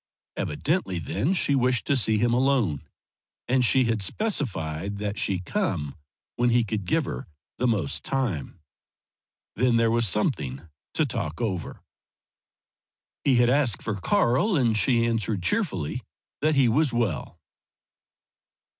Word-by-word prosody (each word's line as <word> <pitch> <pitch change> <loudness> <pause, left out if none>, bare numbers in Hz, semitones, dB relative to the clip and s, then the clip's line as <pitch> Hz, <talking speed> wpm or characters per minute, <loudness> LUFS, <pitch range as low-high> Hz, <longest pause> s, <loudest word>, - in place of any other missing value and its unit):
Evidently 95 -2 -1
then 85 - -1
she 145 -4 +2
wished 125 -2 +2
to 140 - +2
see 110 -4 +2
him 120 +2 +2
alone; 120 - +1 0.6
and 125 +1 +2
she 130 +2 +4
had 115 -3 0
specified 100 - -1
that 105 0 -3
she 95 - 0
come 90 - -2 0.4
when 120 0 +2
he 120 0 +3
could 105 -2 -3
give 90 - +1
her 65 - -6 0.3
the 125 - +2
most 100 -12 0
time. 95 - -2 1.0
Then 125 +1 +2
there 115 -1 +3
was 115 -1 +2
something 80 - -1 0.3
to 155 - +2
talk 100 - -4
over. 95 -8 -3 1.4
He 135 - +3
had 120 0 +4
asked 135 -6 +1
for 110 - -2
Karl, 190 - +2
and 120 -7 +2
she 115 +2 +3
answered, 110 -4 -1
cheerfully, 125 - -1 0.4
that 155 +1 +2
he 135 -3 +4
was 140 +4 +2
well. 115 -10 -2
115 Hz, 135 wpm, -25 LUFS, 95-130 Hz, 1.4 s, she